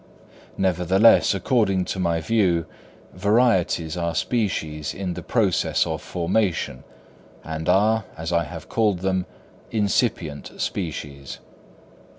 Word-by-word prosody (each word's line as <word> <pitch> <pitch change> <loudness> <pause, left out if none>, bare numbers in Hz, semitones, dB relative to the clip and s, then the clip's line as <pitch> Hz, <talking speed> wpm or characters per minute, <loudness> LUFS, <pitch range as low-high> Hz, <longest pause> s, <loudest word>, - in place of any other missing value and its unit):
Nevertheless 95 +4 +4
according 95 -4 +1
to 95 - -4
my 85 -2 0
view, 90 -5 +2 0.5
varieties 95 -6 +2
are 85 -1 -2
species 80 - -1
in 90 -2 -3
the - - -6
process - - +1
of - - -3
formation, 90 +1 -1 0.6
or 80 +1 -4
are, 105 +3 +3
as 80 +1 -4
I 85 -1 +2
have - - -9
called 105 -6 +1
them, 95 -1 0 0.4
incipient 100 - -1
species. 75 -6 -4
90 Hz, 110 wpm, -23 LUFS, 85-105 Hz, 0.6 s, Nevertheless